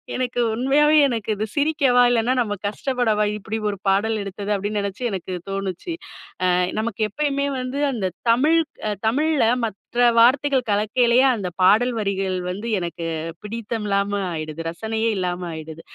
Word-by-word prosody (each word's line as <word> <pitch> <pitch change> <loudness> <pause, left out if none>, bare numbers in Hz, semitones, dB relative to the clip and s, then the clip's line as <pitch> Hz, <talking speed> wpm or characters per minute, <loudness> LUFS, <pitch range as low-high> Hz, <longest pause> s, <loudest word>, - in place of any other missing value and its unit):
எனக்கு 250 -1 -2
உண்மையாவே 280 +6 +3
எனக்கு 230 -4 -3
இது 210 +2 -2
சிரிக்கவா? 285 -4 +3
இல்லனா 235 +1 +2
நம்ம 220 -4 0
கஷ்டப்படவா? 220 -1 0
இப்டி 210 +1 -4
ஒரு 200 - -4
பாடல் 205 +3 +2
எடுத்தது 200 +1 -5
அப்டின்னு 205 +1 -2
நினச்சு 200 +4 -5
எனக்கு 190 -1 -5 0.2
தோணுச்சு. 195 - -4 0.5
அ - - +3 0.3
நமக்கு 220 -1 -3
எப்பயுமே 280 +3 -1
வந்து 255 +2 -4
அந்த 225 -7 -3 0.2
தமிழ் 290 +8 +4 0.3
அ - - 0 0.2
தமிழ்ல 300 +5 +2 0.2
மற்ற 210 -3 -6 0.4
வார்த்தைகள் 260 +2 +4
கலக்கையிலயே, 235 +4 +3
அந்த 200 -5 -4
பாடல் 225 +7 +4
வரிகள் 195 -2 -1
வந்து 200 +5 -5
எனக்கு 170 -1 -5 0.4
பிடித்தம் 225 0 -4
இல்லாம 200 0 0
ஆயிடுது. 155 -1 -5
ரசனையே 220 +6 -2
இல்லாம 180 -1 -2
ஆயிடுது. 160 0 -8
220 Hz, 145 wpm, -22 LUFS, 195-250 Hz, 0.5 s, தமிழ்